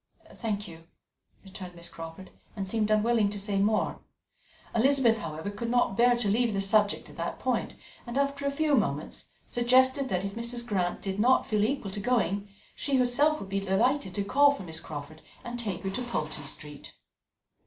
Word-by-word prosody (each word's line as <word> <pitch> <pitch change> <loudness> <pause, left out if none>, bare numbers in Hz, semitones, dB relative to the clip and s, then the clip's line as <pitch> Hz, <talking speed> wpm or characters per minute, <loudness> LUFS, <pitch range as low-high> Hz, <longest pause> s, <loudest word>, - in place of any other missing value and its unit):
"Thank 210 -2 -3
you," 165 -1 -12 0.6
returned 185 -2 -9
Miss 170 0 -7
Crawford, 165 +3 -9 0.2
and 195 -2 -3
seemed 215 +1 0
unwilling 215 0 +3
to 205 - -5
say 200 0 -1
more. 215 +2 +1 0.7
Elizabeth, 240 -1 +4
however, 160 +2 -5
could 230 +3 -4
not 245 -5 +2
bear 240 +2 +4
to 240 -3 0
leave 225 +2 +2
the 195 - 0
subject 205 +1 +2
at - - -16
that - - -3
point, - - -1 0.3
and 240 +2 -4
after 280 0 0
a - - +3
few 300 +1 0
moments - - 0 0.2
suggested 260 +2 +3
that 185 -1 -1
if 195 - -4
Mrs. 235 +1 -4
Grant 185 -6 -1
did 195 0 -3
not 255 +4 +4
feel 210 -1 +1
equal 220 -4 -1
to 205 - -4
going, 205 -3 0 0.2
she 280 - -1
herself 285 +5 +3
would 195 - -8
be 195 0 0
delighted 195 +2 +1
to 200 - 0
call 285 +8 +5
for 280 -8 -2
Miss 160 -2 -3
Crawford 155 0 -8 0.2
and 240 0 -5
take 200 -6 -3
her 195 - -2
to 250 - -3
Pulteney 155 - -3
Street. 150 +1 -7
210 Hz, 185 wpm, -28 LUFS, 195-245 Hz, 0.7 s, call